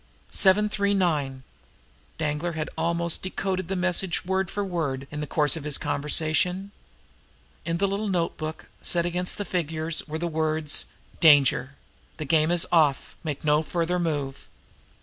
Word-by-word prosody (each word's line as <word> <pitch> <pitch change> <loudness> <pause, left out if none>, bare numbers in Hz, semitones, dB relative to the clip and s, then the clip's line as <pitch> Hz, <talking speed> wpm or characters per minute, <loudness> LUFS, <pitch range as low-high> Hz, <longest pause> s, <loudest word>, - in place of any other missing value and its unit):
"Seven 200 +2 +4
Three 200 -1 0
Nine!" 145 -8 0 0.7
Danglar 155 +2 -2
had 155 -1 -4
almost 170 +1 0
decoded 185 -1 -2
the 195 - -2
message 180 0 0
word 190 0 0
for 205 -1 -2
word 150 -8 -2
in 150 0 -5
the 150 - -4
course 150 -1 +2
of 160 - -6
his 150 -1 +2
conversation. 160 +6 +1 0.9
In 170 0 -1
the 200 +3 +1
little 200 +2 -2
notebook, 165 -3 -3
set 170 -1 0
against 180 +1 0
the 205 - -3
figures, 160 -2 -2
were 155 +1 -4
the 170 - -3
words: 155 -2 +1 0.3
"Danger. 140 -3 +5 0.4
The 155 - -4
game 155 +1 +3
is 175 -1 +1
off. 155 -5 +2
Make 150 -4 -4
no 150 0 +3
further 170 +2 -1
move." 145 -5 -3
165 Hz, 150 wpm, -25 LUFS, 150-180 Hz, 0.9 s, Danger